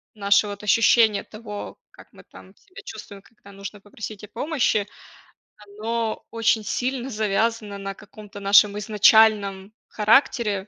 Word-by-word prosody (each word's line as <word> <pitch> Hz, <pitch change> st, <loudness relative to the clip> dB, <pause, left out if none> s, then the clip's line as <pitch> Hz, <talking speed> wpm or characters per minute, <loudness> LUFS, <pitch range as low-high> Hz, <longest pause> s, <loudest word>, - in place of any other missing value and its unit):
наше 200 Hz, 0 st, +2 dB
вот 205 Hz, 0 st, -8 dB
ощущение 220 Hz, 0 st, +3 dB
того, 215 Hz, -1 st, -9 dB
как -, -, -18 dB
мы -, -, -17 dB
там -, -, -17 dB
себя 395 Hz, 0 st, -15 dB
чувствуем, 210 Hz, -, -10 dB
когда 215 Hz, -2 st, -19 dB
нужно 200 Hz, +1 st, -9 dB
попросить 210 Hz, 0 st, -9 dB
о -, -, -9 dB
помощи, 240 Hz, -5 st, -1 dB, 0.7 s
оно 220 Hz, +2 st, -4 dB
очень 225 Hz, -1 st, +1 dB
сильно 255 Hz, +4 st, -3 dB
завязано 215 Hz, -1 st, -1 dB
на 195 Hz, 0 st, -6 dB
каком-то 210 Hz, 0 st, -13 dB
нашем 200 Hz, +1 st, +4 dB
изначальном 210 Hz, -1 st, +3 dB
характере, 210 Hz, -3 st, +1 dB
210 Hz, 130 wpm, -23 LUFS, 200-225 Hz, 0.7 s, нашем